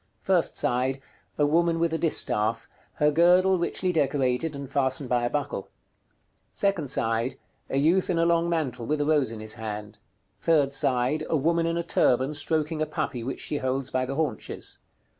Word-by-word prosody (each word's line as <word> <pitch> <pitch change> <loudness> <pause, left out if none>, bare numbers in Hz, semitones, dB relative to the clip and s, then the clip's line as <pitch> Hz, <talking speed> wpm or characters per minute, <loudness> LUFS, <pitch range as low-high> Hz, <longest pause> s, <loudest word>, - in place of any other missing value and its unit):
First 185 -3 +1
side. 130 +2 0 0.4
A 145 - +3
woman 165 +2 +2
with 165 0 0
a - - +1
distaff; 110 -8 0 0.3
her 150 0 +2
girdle 180 +4 +4
richly 180 +2 0
decorated, 140 -1 0
and 140 -1 -6
fastened 130 -1 -1
by 120 -1 +2
a - - 0
buckle. 145 -9 -3 0.8
Second 190 -8 0
side. 115 +2 0 0.3
A - - -1
youth 165 +7 +3
in 175 - +1
a 165 - +3
long 170 0 +2
mantle, 130 -8 -2
with 150 0 0
a 145 - +1
rose 145 -6 +2
in 110 -1 -7
his 110 0 -6
hand. 105 -1 -7 0.4
Third 145 -4 +2
side. 135 +2 +1
A 160 - +2
woman 165 +3 +1
in 165 0 -1
a 170 - -1
turban 130 -4 +2
stroking 155 +1 -1
a 155 - 0
puppy 120 -2 -3
which 135 - -4
she 150 - -2
holds 130 0 -2
by 130 0 0
the 135 - -4
haunches. 145 -8 -3
145 Hz, 180 wpm, -26 LUFS, 130-165 Hz, 0.8 s, girdle